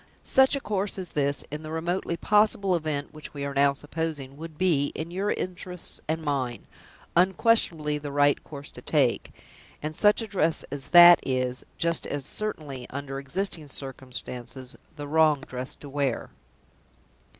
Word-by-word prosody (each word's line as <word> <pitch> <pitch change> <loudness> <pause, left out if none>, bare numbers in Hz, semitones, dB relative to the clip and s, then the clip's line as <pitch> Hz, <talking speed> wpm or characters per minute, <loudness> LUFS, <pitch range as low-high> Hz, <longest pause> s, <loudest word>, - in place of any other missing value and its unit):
Such 265 +1 +4
a - - -1
course 200 -3 -1
as 185 -3 -5
this 140 -2 0
(in 150 +1 -5
the 155 - -8
remotely 170 +2 -2
possible 210 -1 +3
event 155 -3 -3
which 155 -1 -10
we 140 0 -3
are 140 - -4
now 140 0 +4
supposing) 145 -2 -4
would 160 +1 -9
be, 160 -6 +2
in 160 +2 -5
your 195 +3 -1
interests 180 -2 -4
and 160 +1 -2
mine, 135 -5 -2 0.5
unquestionably 175 -5 +3
the 145 -1 -6
right 145 0 +3
course 145 -1 -9
to - - -11
take; - - +1 0.5
and 155 +1 -5
such 210 +5 +4
a - - -6
dress 165 -6 0
as 140 -1 -4
that 175 -1 +9
is, 130 -1 -2
just 170 -1 +1
as 145 -2 -3
certainly, 150 -11 -2
under 135 0 -5
existing 160 +2 -2
circumstances, 130 -1 -6 0.2
the 145 -1 -6
wrong 155 -1 +4
dress 130 0 -4
to 145 - -12
wear." 140 -3 -2
150 Hz, 160 wpm, -26 LUFS, 140-175 Hz, 0.5 s, that